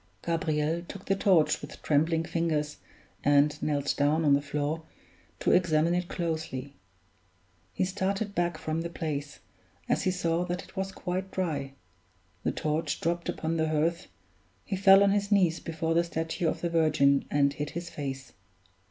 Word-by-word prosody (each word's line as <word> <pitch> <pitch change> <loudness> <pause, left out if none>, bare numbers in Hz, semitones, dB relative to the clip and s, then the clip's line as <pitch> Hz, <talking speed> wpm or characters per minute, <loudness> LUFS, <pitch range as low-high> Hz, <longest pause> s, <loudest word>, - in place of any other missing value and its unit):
Gabriel 160 -1 0
took 190 +2 -10
the 195 - +2
torch 185 -5 +3
with 145 +1 -9
trembling 160 +2 +2
fingers 155 -3 -1 0.5
and 145 +1 +3
knelt 145 -2 0
down 150 +3 +2
on 145 - +5
the 140 - +3
floor 150 +2 -2 0.6
to - - +2
examine 165 -1 +3
it 180 0 -1
closely. 160 -6 -3 1.0
He - - 0
started 195 +2 -2
back 175 -3 0
from 155 +1 -2
the 170 - -4
place, 150 -4 -4 0.5
as - - +1
he 190 - +1
saw 175 -2 0
that 180 0 -3
it - - -17
was 190 0 -2
quite 185 0 -4
dry 155 -8 -2 0.7
the - - 0
torch 155 +1 -1
dropped 170 +1 -1
upon 165 +1 -2
the 160 -1 +1
hearth 160 +3 0 0.6
he 195 - -2
fell 195 +1 +7
on 200 - +4
his 200 0 0
knees 180 -5 +3
before 165 0 -2
the 170 +1 +3
statue 165 0 -2
of - - -1
the 170 - 0
Virgin 155 -4 +3
and 140 -1 +2
hid 150 +1 -4
his 170 0 -6
face. 135 -3 -6
165 Hz, 165 wpm, -28 LUFS, 150-175 Hz, 1.0 s, fell